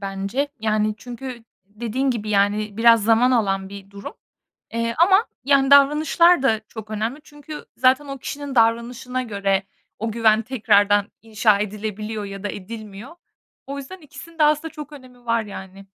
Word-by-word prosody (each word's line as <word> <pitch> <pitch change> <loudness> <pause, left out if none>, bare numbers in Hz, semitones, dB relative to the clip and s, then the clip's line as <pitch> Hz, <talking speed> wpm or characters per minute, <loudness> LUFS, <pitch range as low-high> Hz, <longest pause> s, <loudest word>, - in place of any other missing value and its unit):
bence. 195 +8 -3
Yani, 215 -1 0
çünkü 245 -1 -8 0.2
dediğin 235 +6 -2
gibi, 215 -3 -3
yani, 205 +1 +1
biraz 230 -2 +5
zaman 230 +3 +4
alan 195 -5 0
bir 195 0 -11
durum, 200 - -9 0.6
eee, 230 0 -1
ama, 385 +6 +5 0.2
yani, 275 -1 +3
davranışlar 300 +3 +5
da 220 -5 +2
çok 220 -1 -10
önemli. 225 +7 -3
Çünkü 295 +1 -10
zaten 260 +3 +3
o 275 0 -6
kişinin 285 +1 -6
davranışına 235 +2 +1
göre 200 -4 -1 0.4
o 225 +1 -3
güven 220 0 +3
tekrardan 205 -4 +2
inşa 215 -2 +2
edilebiliyor 210 +1 -4
ya 195 0 -8
da - - -1
edilmiyor. 215 - -9 0.5
O 280 +1 -5
yüzden 280 +8 -9
ikisinin 330 +2 -13
de 310 - +3
aslında 305 +2 +1
çok 300 -1 -9
önemi 250 -3 -14
var, 230 -1 +1
yani. 195 -1 -10
230 Hz, 155 wpm, -22 LUFS, 210-270 Hz, 0.6 s, biraz